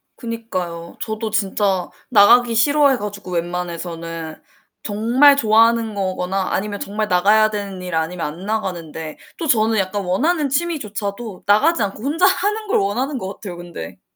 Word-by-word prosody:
그니까요. 185 -8 -5
저도 220 0 -3
진짜 195 -3 0 0.2
나가기 235 +2 +6
싫어해 285 +3 +4
가지고 205 -3 -7
웬만해서는 170 -2 -4 0.4
정말 235 +7 +4
좋아하는 225 -1 +3
거거나 190 -1 -2
아니면 205 +1 -2
정말 210 +1 -3
나가야 205 +4 +4
되는 200 -3 -5
일 180 -2 -6
아니면 165 +2 -2
안 165 +6 -6
나가는데 170 -7 -4 0.2
또 330 - -4
저는 220 -3 +3
약간 195 +1 -1
원하는 295 - +1
취미조차도 220 - -3
나가지 225 +9 +3
않고 205 +2 -4
혼자 315 +7 +2
하는 415 +3 +1
걸 - - +2
원하는 250 +8 -1
것 195 -3 -5
같아요, 180 -5 -8
근데. 170 - -9
205 Hz, 350 characters per minute, -20 LUFS, 180-235 Hz, 0.4 s, 나가기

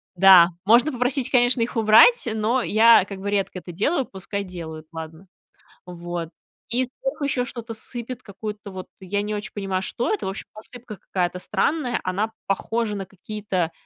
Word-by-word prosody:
Да, 180 -2 +8 0.2
можно 240 +8 +5
попросить, 250 +1 -1
конечно, 245 -1 +3
их 235 +2 -2
убрать, 225 - +6
но 220 +4 +1
я, 225 -1 +6
как 195 -1 -8
бы, 200 +1 -3
редко 195 -2 -1
это 180 - -10
делаю, 260 - 0
пускай 200 +1 -5
делают, 165 -4 -8
ладно. 160 +2 -9 0.6
Вот, 175 -1 -6 0.4
и 245 +3 +1
вдруг - - -6
ещё 270 -3 0
что-то 235 -2 -7
сыпет, 240 +2 -6
какую-то 210 0 -7
вот 185 -1 -8
я 200 +2 -2
не 210 0 -3
очень 210 +2 -5
понимаю, 195 -2 -2
что 235 +5 -2
это. 425 - -3
В - - -1
общем, 195 - -6
посыпка 225 +1 -9
какая-то 180 -2 -2
странная. 245 - 0
Она 200 +4 -1 0.2
похожа 215 +2 -1
на 195 -1 -4
какие-то, 190 -2 -3
210 Hz, 170 wpm, -23 LUFS, 185-240 Hz, 0.6 s, Да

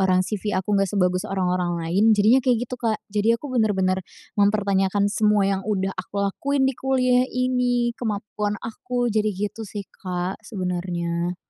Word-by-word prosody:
orang 185 -1 +3
CV 210 -1 -2
aku 190 +2 -3
nggak 195 -1 +2
sebagus 180 -2 0
orang-orang 180 -2 0
lain," 205 +6 +3
jadinya 220 +6 +5
kayak 245 -2 +1
gitu, 250 - -17
Kak. 225 -2 +1 0.2
Jadi 220 +3 +3
aku 265 +2 -8
benar-benar 190 -5 +2 0.3
mempertanyakan 200 -1 +2
semua 210 -2 +3
yang 195 0 +1
udah 195 -2 -1
aku 200 +2 -3
lakuin 275 +7 0
di 265 - +2
kuliah 255 -1 +2
ini, 250 -1 +1
kemampuan 210 -2 -2
aku, 245 0 -2
jadi 215 -1 +2
gitu 210 +2 -4
sih, 205 -1 -6
Kak, 180 +1 -4
sebenarnya. 175 -4 -3
205 Hz, 155 wpm, -23 LUFS, 190-230 Hz, 0.3 s, jadinya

